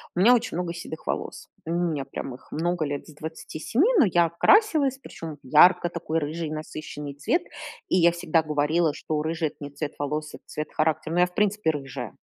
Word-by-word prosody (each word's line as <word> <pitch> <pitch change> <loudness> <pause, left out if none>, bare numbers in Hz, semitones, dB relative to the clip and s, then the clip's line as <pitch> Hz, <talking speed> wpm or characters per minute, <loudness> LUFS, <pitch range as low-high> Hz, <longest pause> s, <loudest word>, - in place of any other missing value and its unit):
У - - -1
меня 230 +7 +7
очень 230 -8 0
много 175 -1 -2
седых 165 -2 -8
волос, - - -4 0.2
у 165 - -4
меня 170 -5 0
прям 130 - -6
их - - -17
много 175 +1 -1
лет 145 0 -4
с 155 - -13
27, 160 - -1
но 270 - +7
я 175 -3 +3
красилась, 295 - +4
причём 165 - -8
в - - -14
ярко 175 +5 +6
такой 165 -1 -2
рыжий 155 +1 -3
насыщенный 155 -2 -6
цвет. 335 - 0 0.5
И - - +3
я 170 -1 +6
всегда 170 -1 +1
говорила, 155 +1 +1
что 155 -1 -3
рыжий 160 0 -1
это - - -23
не 145 - -6
цвет 145 +1 -5
волос, 150 +1 -3
это - - -11
цвет 150 0 -5
характера, 155 +1 0
ну 175 - +2
я 180 - +6
в 180 - -18
принципе 210 -3 +1
рыжая. 135 -5 -6
160 Hz, 205 wpm, -25 LUFS, 150-175 Hz, 0.5 s, меня